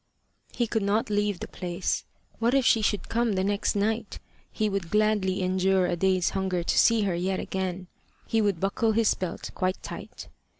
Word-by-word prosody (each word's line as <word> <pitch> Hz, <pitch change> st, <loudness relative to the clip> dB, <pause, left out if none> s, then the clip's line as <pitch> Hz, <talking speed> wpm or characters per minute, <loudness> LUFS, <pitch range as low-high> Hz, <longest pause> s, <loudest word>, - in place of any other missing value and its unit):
He 240 Hz, -, +1 dB
could 220 Hz, -1 st, -1 dB
not 210 Hz, +4 st, 0 dB
leave 205 Hz, -2 st, 0 dB
the -, -, -4 dB
place. 180 Hz, 0 st, -3 dB, 0.3 s
What 235 Hz, +3 st, +2 dB
if 270 Hz, -2 st, +3 dB
she 225 Hz, -, +4 dB
should 205 Hz, -1 st, 0 dB
come 235 Hz, -1 st, +1 dB
the 190 Hz, -1 st, 0 dB
next 200 Hz, +1 st, 0 dB
night! 220 Hz, +2 st, -1 dB, 0.3 s
He 215 Hz, -, 0 dB
would 195 Hz, -4 st, -2 dB
gladly 210 Hz, -2 st, +1 dB
endure 185 Hz, 0 st, +2 dB
a 180 Hz, -, 0 dB
day's 185 Hz, 0 st, +1 dB
hunger 190 Hz, -2 st, -1 dB
to -, -, 0 dB
see 230 Hz, -1 st, +5 dB
her 195 Hz, -3 st, 0 dB
yet 185 Hz, +2 st, -1 dB
again: 185 Hz, -1 st, -3 dB, 0.4 s
he 225 Hz, -, +1 dB
would 200 Hz, -5 st, +1 dB
buckle 220 Hz, +4 st, +1 dB
his 225 Hz, -1 st, +3 dB
belt 180 Hz, -3 st, -5 dB
quite 185 Hz, 0 st, -2 dB
tight. -, -, -8 dB
195 Hz, 185 wpm, -27 LUFS, 185-215 Hz, 0.4 s, see